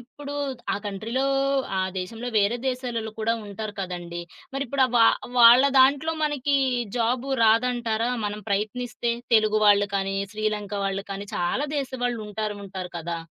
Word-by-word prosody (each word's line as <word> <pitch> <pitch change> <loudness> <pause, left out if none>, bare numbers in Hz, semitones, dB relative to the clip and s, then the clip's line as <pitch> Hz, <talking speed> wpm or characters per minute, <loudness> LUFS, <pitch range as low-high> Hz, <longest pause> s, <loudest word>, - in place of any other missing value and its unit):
ఇప్పుడు 285 +4 -10 0.4
ఆ - - +1
కంట్రీలో, 225 +7 -2 0.5
ఆ - - +1 0.2
దేశంలో, 225 +7 -5
వేరే 205 +3 +2
దేశాలోల్లు 240 -4 -3
కూడా 225 +1 +1
ఉంటారు 210 +1 -6
కదండి! 175 -2 -5 0.3
మరిప్పుడు 275 0 0
ఆ - - -8
వా 230 - +7 0.3
వాళ్ళ 240 +2 +9
దాంట్లో 280 +5 +4
మనకి, 285 -1 +1 0.4
జాబు 245 +3 0
రాదంటారా? 230 0 +2
మనం 210 +1 -3
ప్రయత్నిస్తే 235 +4 -1 0.2
తెలుగు 215 -1 +4
వాళ్ళు 205 0 +5
కానీ, 195 0 -1 0.2
శ్రీలంక 210 -1 -2
వాళ్ళు 195 0 -2
కానీ, 200 +1 -6
చాలా 180 +12 0
దేశవాళ్ళుంటారుంటారు 215 -7 -4
కదా! 170 +1 -4
220 Hz, 130 wpm, -25 LUFS, 200-250 Hz, 0.5 s, వాళ్ళ